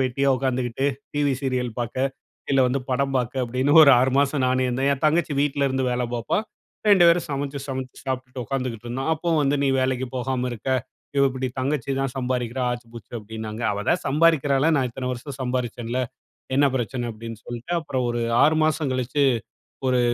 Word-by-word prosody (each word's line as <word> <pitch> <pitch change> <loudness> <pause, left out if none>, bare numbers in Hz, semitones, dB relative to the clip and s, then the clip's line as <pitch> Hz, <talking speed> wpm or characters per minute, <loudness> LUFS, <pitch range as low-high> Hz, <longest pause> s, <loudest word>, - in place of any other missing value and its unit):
வெட்டியா 135 +2 +1
உட்காந்துக்கிட்டு, 130 0 -1 0.3
TV 145 -1 +2
serial 130 -3 -1
பார்க்க, 130 +3 -1 0.4
இல்ல 135 -1 +4
வந்து 130 +2 0
படம் 135 +1 0
பாக்க, 125 0 0
அப்டின்னு 130 +5 +1
ஒரு 140 - +8
6 130 +1 +3
மாசம் 140 -1 +2
நான் 130 0 +2
என்னா 130 +2 -1
என் 140 - -4
தங்கச்சி 155 0 +2
வீட்ல 145 -1 +1
இருந்து 130 0 0
வேல 125 0 0
பார்ப்பா, 115 - 0 0.5
2 190 -4 +7
பேரும் 170 0 +4
சமைச்சு 140 0 -3
சமைச்சு 130 -1 -5
சாப்புட்டுட 130 0 -4
உட்காந்துகிட்டு 125 -4 -3
இருந்தோம். 130 +5 -3
அப்புவும் 160 0 +1
வந்து 140 +1 +2
நீ 140 - +2
வேலைக்கி 130 0 0
போகாம 125 0 -1
இருக்க, 120 +3 -6 0.5
இவ 140 - +5
இப்டி 130 0 -3
தங்கச்சி 140 0 -1
தான் 135 -2 -1
சம்பாதிக்கிறா! 125 -1 -1
ஆச்சு 120 -1 -6
பூச்சு 115 -1 -11
அப்டின்னாங்க. 110 +1 -6
அவ 105 0 -2
தான் 180 - +2
சம்பாதிக்கிறால்ல. 145 -1 +3
நான் 130 -2 +2
இத்தன 125 +1 -4
வருஷம் 130 +2 -7
சம்பாதித்தேன்ல. 125 -1 -2 0.6
என்ன 140 0 +5
பிரச்சன 120 0 -2
அப்டின்னு 115 0 -8
சொல்டு, 120 +7 -7
அப்புறம் 130 -5 -2
ஒரு 120 0 -2 0.2
6 155 +2 +5
மாசம் 155 -3 0
கழிச்சு, 130 +3 0 0.6
ஒரு 125 -1 +3
130 Hz, 175 wpm, -24 LUFS, 125-140 Hz, 0.6 s, ஒரு